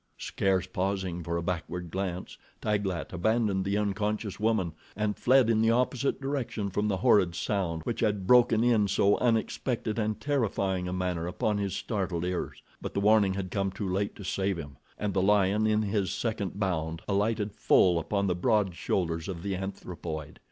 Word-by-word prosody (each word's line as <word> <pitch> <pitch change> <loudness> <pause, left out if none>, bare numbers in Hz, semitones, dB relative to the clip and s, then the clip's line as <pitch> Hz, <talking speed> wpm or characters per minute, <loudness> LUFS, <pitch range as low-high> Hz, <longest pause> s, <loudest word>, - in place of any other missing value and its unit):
Scarce 95 -2 0
pausing 95 -1 -2
for 85 +1 -2
a 85 - -3
backward 90 0 -4
glance, 95 -1 -4 0.2
Taglat 100 -5 -2
abandoned 100 +1 +1
the 100 +1 0
unconscious 105 0 -2
woman 105 -6 +1 0.2
and 105 0 -1
fled 130 -1 +4
in 110 -1 +3
the 115 - +4
opposite 125 +2 +1
direction 135 -7 -3
from 105 +3 0
the 100 -2 0
horrid 100 -7 +4
sound 85 -4 -1
which 115 - -3
had 105 -4 0
broken 115 0 +5
in 115 -4 +3
so 100 +1 +3
unexpected 115 -1 0
and 110 -1 -1
terrifying 100 -10 0
a - - -3
manner 90 -2 -2
upon 105 +3 -1
his 100 -2 -2
startled 95 -6 -2
ears; 90 -1 -4 0.2
but - - -6
the - - +2
warning 100 -2 +4
had 95 -2 -4
come 95 -1 0
too 100 +1 -4
late 95 +2 -1
to 100 - -9
save 95 0 -1
him, 70 -4 -8 0.2
and 105 -2 -2
the 95 - +2
lion, 105 +2 +3
in 110 0 +2
his 100 -2 0
second 105 -4 -3
bound, 80 -4 -2
alighted 105 +1 0
full 90 -4 +4
upon 100 +4 -1
the 95 - +1
broad 100 0 +1
shoulders 85 -1 -1
of 90 -3 -5
the 100 -1 -1
anthropoid. 85 -5 -6
100 Hz, 180 wpm, -29 LUFS, 90-110 Hz, 0.2 s, broken